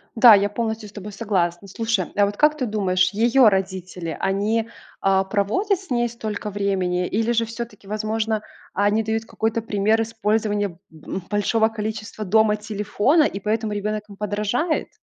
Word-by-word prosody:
Да, 230 -1 +9
я 200 +1 +2
полностью 220 -1 -3
с - - -16
тобой 210 0 -8
согласна. 195 -3 -1
Слушай, 220 -2 -1
а 205 - +5
вот 200 +1 -3
как 300 +5 +3
ты 260 - -1
думаешь, 195 -4 +1
её 235 +4 +5
родители, 185 -3 -3
они, 215 +4 0 0.3
а, 195 0 +3
проводят 215 - 0
с 380 - -15
ней 240 -2 +1
столько 215 -3 -5
времени, 190 -3 0
или 225 +3 0
же 230 -1 +2
всё-таки, 230 -3 -8
возможно, 215 +1 -1 0.3
они 205 +3 +2
дают 220 +1 -1
какой-то 225 +1 -1
пример 215 +1 +1
использования 215 -2 0
б 170 - -15 0.4
м, 190 - -3
большого 220 +2 +2
количества 215 0 -5
дома 215 +2 +3
телефона, 210 - +1
и 200 - -1
поэтому 215 +2 -1
ребёнок 210 +1 -2
им 200 - -12
подражает? 210 - -1
215 Hz, 165 wpm, -22 LUFS, 200-225 Hz, 0.4 s, Да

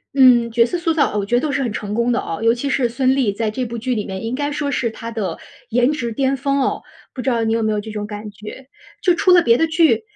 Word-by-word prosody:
嗯， 245 -3 +6
角 230 0 +4
色 355 - -2
塑 340 -2 0
造， 310 - +1
哦， 210 - 0
我 200 - -2
觉 240 +4 0
得 245 - +3
都 300 - -1
是 275 0 -1
很 240 -4 -1
成 210 0 -4
功 235 +2 +1
的 240 - +1
哦， 165 - -5
尤 230 0 +4
其 260 +4 -3
是 260 -2 +1
孙 255 +2 +1
俪 255 -7 +1
在 220 -1 -1
这 255 +3 -3
部 235 0 -6
剧 250 +2 -2
里 210 -3 -2
面 190 0 -6
应 230 +2 -3
该 290 +2 -2
说 290 -1 -2
是 245 -3 0
她 230 +1 -8
的 195 -7 -3 0.3
颜 245 +4 +2
值 235 -6 -3
巅 270 +3 +1
峰 275 +1 0
哦， - - -1 0.3
不 255 - -5
知 265 - 0
道 230 -2 +1
你 225 - +1
有 230 - 0
没 215 0 +1
有 210 - -1
这 220 - -8
种 210 -1 -5
感 210 0 -7
觉。 215 +6 -11 0.3
就 360 - +4
出 365 +2 +2
了 355 - +7
别 235 0 +4
的 325 - +2
剧， 325 +6 +2
240 Hz, 325 characters per minute, -19 LUFS, 220-275 Hz, 0.3 s, 了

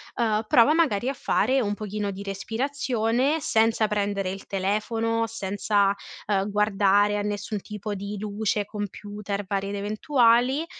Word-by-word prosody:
uhm, 220 -2 +1
prova, 240 +7 +5
magari, 265 -9 +2
a - - -1
fare 265 0 +1
un 205 -3 -1
pochino 210 -1 -3
di 195 +1 -7
respirazione, 240 +5 -1
senza 225 -2 +2
prendere 200 -2 -1
il 195 +1 -8
telefono, 225 +4 0
senza, 200 -1 0 0.3
uhm, 200 -1 +1
guardare 205 0 +3
a - - -1
nessun 205 0 -3
tipo 210 0 -6
di 200 +1 -5
luce, 210 0 -1
computer, 205 0 -5
varie 195 0 -2
ed 200 - -4
eventuali, 240 +6 +2
210 Hz, 140 wpm, -25 LUFS, 200-230 Hz, 0.3 s, prova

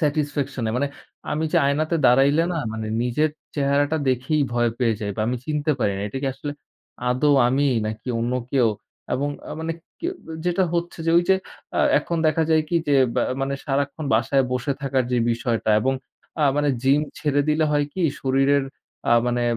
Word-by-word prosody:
Satisfaction 145 -4 -1
নাই। 110 - -1
মানে 145 +2 0 0.4
আমি 155 +2 0
যে - - +3
আয়নাতে 155 +4 +1
দাঁড়াইলে 140 +5 +5
না 170 - -1
মানে 110 0 -4 0.2
নিজের 135 +6 +1 0.2
চেহারাটা 145 +2 +1
দেখেই 130 +4 +1
ভয় 120 -1 +2
পেয়ে 120 -3 +2
যাই। 105 -1 -2
বা - - -2
আমি 125 +2 0
চিনতে 150 0 0
পারি 105 -4 +1
না। - - -4
এটা 135 - -5
কি - - 0
আসলে 145 +2 -5 0.6
আদৌ 145 +4 +3 0.2
আমি 135 +3 +2 0.2
নাকি 110 +3 -6
অন্য 120 +2 -1 0.2
কেউ? 125 -5 +4 0.5
এবং 140 +2 -1 0.2
আ - - -4
মানে 165 0 -2 0.3
কে 340 - -1 0.4
যেটা 180 +1 +2
হচ্ছে 170 0 -2
যে - - +3
ঐ - - +8
যে 190 - +6 0.4
আ - - +4 0.2
এখন 170 +3 -3
দেখা 160 +1 +2
যায় 155 -1 +4
কি 170 - +1
যে 145 - +4 0.2
বা - - +2 0.2
মানে 135 0 -1
সারাক্ষণ 140 +2 -1
বাসায় 135 +4 +2
বসে 125 +2 -1
থাকার 135 -2 +1
যে 125 - +3
বিষয়টা 115 -1 0
এবং 130 +4 +1 0.5
আ - - +5
মানে 145 0 +2
জিম 135 +2 +4 0.2
ছেড়ে 145 -2 +1
দিলে 155 +1 +3
হয় 145 -1 +2
কি 185 - -2 0.2
শরীরের 135 +1 +2 0.5
আ - - +6
মানে 120 0 0
140 Hz, 190 wpm, -23 LUFS, 125-150 Hz, 0.6 s, ঐ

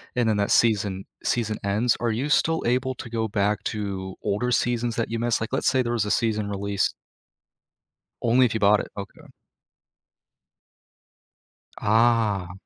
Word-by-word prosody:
and 120 -2 +2
then 105 - +1
that 100 - 0
season 100 -4 +2 0.2
season 110 -3 -1
ends, 105 +4 +1
are 120 -1 0
you 130 +7 -2
still 160 +2 +2
able 125 +2 0
to 120 - -8
go 110 -1 -1
back 105 -1 0
to 95 -3 -4
older 105 +4 -1
seasons 120 -1 0
that 115 - -1
you 115 - -2
missed? 120 -1 0
Like, 115 - -4
let's 135 - 0
say 130 -1 +3
there 120 - -2
was 110 -3 0
a 105 - -2
season 110 -2 0
released 100 -1 -1 1.3
Only 125 +2 +4
if 115 - -3
you 110 - -1
bought 105 +1 +5
it. - - -6
Okay. 100 -1 -8 2.6
Ah. 110 -4 +2
110 Hz, 160 wpm, -24 LUFS, 100-120 Hz, 2.6 s, bought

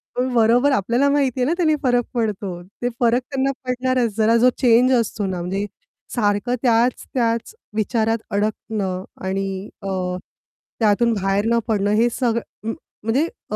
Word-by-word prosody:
पण 250 +1 -1
बरोबर 240 +4 +4
आपल्याला 245 +4 +2
माहिती 275 -3 +1
आहे - - +3
ना, 305 - +1
त्याने 315 -4 +3
फरक 245 -2 +2
पडतो. 205 -6 -2 0.2
ते 245 - +1
फरक 240 +1 +3
त्यांना 270 0 +1
पडणारच. 250 -3 0
जरा 225 +1 +4
जो 245 +2 +5
चेंज 250 0 +5
असतो 225 -3 0
ना, 185 -2 -2
म्हणजे 195 +3 -2 0.5
सारखं 210 +1 +1
त्याच-त्याच 235 - +1 0.2
विचारात 225 +1 +1
अडकणं 200 -2 -2 0.2
आणि 195 +1 -1 0.4
अ, 195 - -4 0.9
त्यातून 225 +1 +3
बाहेर 195 0 0
न 235 0 +3
पडणं 205 -2 +1
हे 235 +2 +4
सग 235 -2 0 0.2
म 225 +1 -2 0.3
म्हणजे 240 +8 +2 0.3
अ, - - 0
230 Hz, 150 wpm, -21 LUFS, 205-250 Hz, 0.9 s, जो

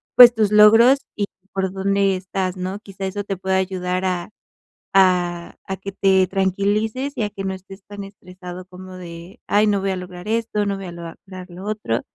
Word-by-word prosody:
pues, 245 -1 +10
tus 215 -3 +1
logros 225 +6 +7 0.2
y 205 -1 -1 0.3
por 190 -1 -1
dónde 195 0 +1
estás, 185 0 -3
¿no? 185 +2 -4
Quizá 195 -2 -7
eso 205 +2 -3
te 195 -2 -4
pueda 190 0 0
ayudar 185 -1 -1
a 180 +1 -2 0.6
a 180 -2 +2
a 190 - -2
que 195 +1 -7
te 190 -1 +3
tranquilices 205 +8 0
y - - -1
a 210 - -1
que 195 -1 -7
no 190 - -2
estés 190 +1 -11
tan 205 -1 -8
estresado 185 -2 -10
como 185 0 -11
de: 175 +3 -10
"Ay, 210 +1 +3
no 200 -2 +1
voy 195 - -1
a - - -1
lograr 180 +1 -9
esto, 220 -2 0
no 200 -1 -1
voy 195 - -7
a - - -7
lograr 180 +2 -10
lo 180 +3 -10
otro", 210 - -1
190 Hz, 200 wpm, -21 LUFS, 185-205 Hz, 0.6 s, pues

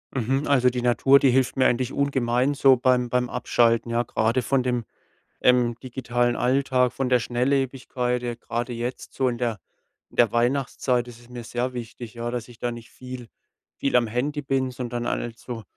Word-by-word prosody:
Mhm. 135 +3 0
Also 130 -3 +4
die 125 0 -3
Natur, 130 +3 +5
die 135 - +4
hilft 130 +1 +1
mir 130 - +4
eigentlich 125 +1 +1
ungemein 130 -1 +1
so 135 -2 +5
beim 125 0 +2
beim 125 0 0
Abschalten, 115 -1 +1
ja? 120 +1 +1
Grade 115 +2 0
von 130 +2 +1
dem, 125 -2 -1 0.6
ähm, 125 -1 +3
digitalen 120 -1 -1
Alltag, 130 -1 +2
von 135 -1 -2
der 125 -1 +4
Schnelllebigkeit, 125 0 -1
ja, 120 -1 -3
grade 120 +1 -4
jetzt 120 +2 -5
so 130 - 0
in 120 - -3
der 115 -4 -1 0.5
in - - -19
der 120 -3 +5
Weihnachtszeit 125 0 0
ist 120 -1 -11
es 120 - -19
mir 120 -1 -7
sehr 125 +2 -3
wichtig, 120 -1 -7
ja? 120 0 -4
Dass 120 -2 -4
ich 120 -2 -15
da 120 - -2
nicht 120 -1 -10
viel 125 -2 -9 0.5
viel 140 - 0
am 120 -1 +5
Handy 140 +6 -2
bin, 135 -1 0
sondern 120 -1 -4
halt 115 -1 -3
so 120 -3 -7
125 Hz, 190 wpm, -24 LUFS, 120-130 Hz, 0.6 s, Natur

